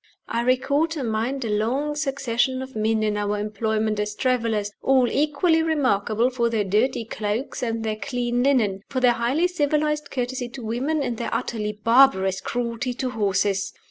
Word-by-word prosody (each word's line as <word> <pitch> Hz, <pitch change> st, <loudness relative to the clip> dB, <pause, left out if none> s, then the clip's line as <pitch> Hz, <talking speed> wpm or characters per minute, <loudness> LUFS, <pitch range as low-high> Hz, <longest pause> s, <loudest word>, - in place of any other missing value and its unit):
I 235 Hz, -, -1 dB
recall 260 Hz, +5 st, +2 dB
to 325 Hz, -4 st, -4 dB
mind 235 Hz, +4 st, -1 dB
a -, -, -2 dB
long 245 Hz, +8 st, 0 dB
succession 260 Hz, -3 st, -1 dB
of 265 Hz, -1 st, -11 dB
men 220 Hz, 0 st, +1 dB
in 210 Hz, -1 st, 0 dB
our 205 Hz, 0 st, -1 dB
employment 215 Hz, 0 st, -1 dB
as 210 Hz, 0 st, -2 dB
travelers, 230 Hz, -5 st, 0 dB
all 260 Hz, -2 st, +4 dB
equally 305 Hz, +5 st, +2 dB
remarkable 250 Hz, -7 st, +1 dB
for 235 Hz, -2 st, 0 dB
their 225 Hz, -2 st, 0 dB
dirty 220 Hz, +5 st, +1 dB
cloaks 215 Hz, +4 st, -3 dB
and 230 Hz, -2 st, -2 dB
their 215 Hz, -1 st, -2 dB
clean 245 Hz, +2 st, -1 dB
linen, 230 Hz, -8 st, +2 dB
for 260 Hz, -, -1 dB
their 250 Hz, -1 st, +5 dB
highly 250 Hz, +9 st, +1 dB
civilized 300 Hz, -3 st, 0 dB
courtesy 250 Hz, -1 st, -3 dB
to 250 Hz, 0 st, -9 dB
women 275 Hz, +7 st, -1 dB
and 245 Hz, -3 st, -3 dB
their 235 Hz, -, -3 dB
utterly 210 Hz, -2 st, -2 dB
barbarous 210 Hz, -4 st, +4 dB
cruelty 245 Hz, +1 st, -3 dB
to 255 Hz, 0 st, -2 dB
horses. 200 Hz, -2 st, 0 dB
240 Hz, 170 wpm, -24 LUFS, 215-270 Hz, -, their